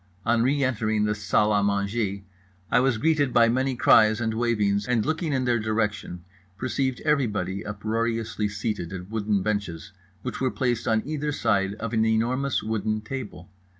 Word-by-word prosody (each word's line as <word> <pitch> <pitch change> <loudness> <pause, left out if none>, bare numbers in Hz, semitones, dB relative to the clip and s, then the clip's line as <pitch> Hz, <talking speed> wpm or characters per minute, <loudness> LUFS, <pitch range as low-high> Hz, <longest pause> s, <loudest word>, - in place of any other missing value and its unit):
On 115 0 +3
re 140 +3 +2
entering 110 -4 0
the 105 0 +1
salle 105 0 +1
à 105 -1 +2
manger 100 0 -1 0.5
I - - +5
was 125 -2 +2
greeted 145 +1 +2
by 115 -1 +5
many 130 +2 0
cries 110 -2 +5
and 110 -1 -1
wavings, 105 -3 0
and 120 -4 +1
looking 160 0 -1
in 130 -2 0
their 120 -1 +2
direction 105 -5 -2 0.3
perceived 130 +2 -1
everybody 105 - 0
uproariously 110 +1 -2
seated 105 -4 -3
at 95 +2 -7
wooden 105 -3 0
benches 100 -3 -3 0.3
which 125 - -5
were 130 - +2
placed 120 -3 -1
on 110 -1 +2
either 150 0 -2
side 100 -7 0
of 115 +2 -5
an 110 -1 +3
enormous 120 +5 +1
wooden 110 0 -1
table. 105 -7 -7
110 Hz, 165 wpm, -25 LUFS, 105-125 Hz, 0.5 s, I